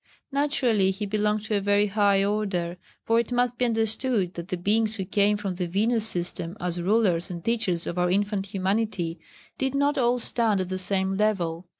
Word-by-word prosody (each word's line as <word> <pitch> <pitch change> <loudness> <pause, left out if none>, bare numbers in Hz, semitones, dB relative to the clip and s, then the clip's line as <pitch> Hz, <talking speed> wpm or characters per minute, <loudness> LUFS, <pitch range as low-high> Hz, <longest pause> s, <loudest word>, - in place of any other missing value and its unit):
Naturally 260 -8 +2
he 195 +2 -3
belonged 210 +1 0
to 215 0 -1
a - - -1
very 205 +1 +3
high 200 -1 +2
order, 195 -4 -1 0.3
for 230 0 +2
it 235 +1 -2
must 245 0 0
be 250 - +3
understood 225 -3 0
that 170 -1 -7
the 185 - -3
Beings 215 +4 +1
who 190 -3 -4
came 205 +2 +2
from 200 -3 -3
the 180 0 -3
Venus 220 +5 +1
system 175 0 -2
as 175 -1 -2
rulers 185 -3 +2
and 170 -2 -7
teachers 220 -8 0
of 175 - -3
our 180 0 +2
infant 200 +1 0
humanity 195 -3 -1 0.4
did 265 0 -1
not 285 +1 +2
all 245 0 +3
stand 225 -4 0
at 185 -1 -2
the 185 0 -3
same 190 0 0
level. 180 -5 0
205 Hz, 195 wpm, -26 LUFS, 185-225 Hz, 0.4 s, very